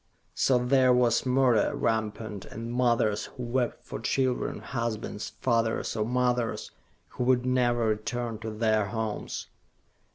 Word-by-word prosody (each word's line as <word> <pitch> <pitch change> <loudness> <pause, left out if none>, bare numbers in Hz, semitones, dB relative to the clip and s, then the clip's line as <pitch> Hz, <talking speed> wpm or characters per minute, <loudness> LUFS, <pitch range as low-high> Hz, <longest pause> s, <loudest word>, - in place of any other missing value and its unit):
So 130 - +3
there 130 +1 +4
was 125 0 +3
murder 125 -4 +3
rampant, 110 -2 -2
and 115 +2 -6
mothers 115 -4 +2
who 125 - -8
wept 120 0 -1
for - - -6
children, 130 -2 0
husbands, 115 -3 -4
fathers 115 -3 +1
or 105 -1 0
mothers, 125 -1 0 0.4
who - - -3
would 125 -1 +3
never 120 -2 +2
return 115 +1 -2
to 110 0 -5
their 110 -1 +1
homes. 110 0 -3
120 Hz, 130 wpm, -28 LUFS, 110-125 Hz, 0.4 s, there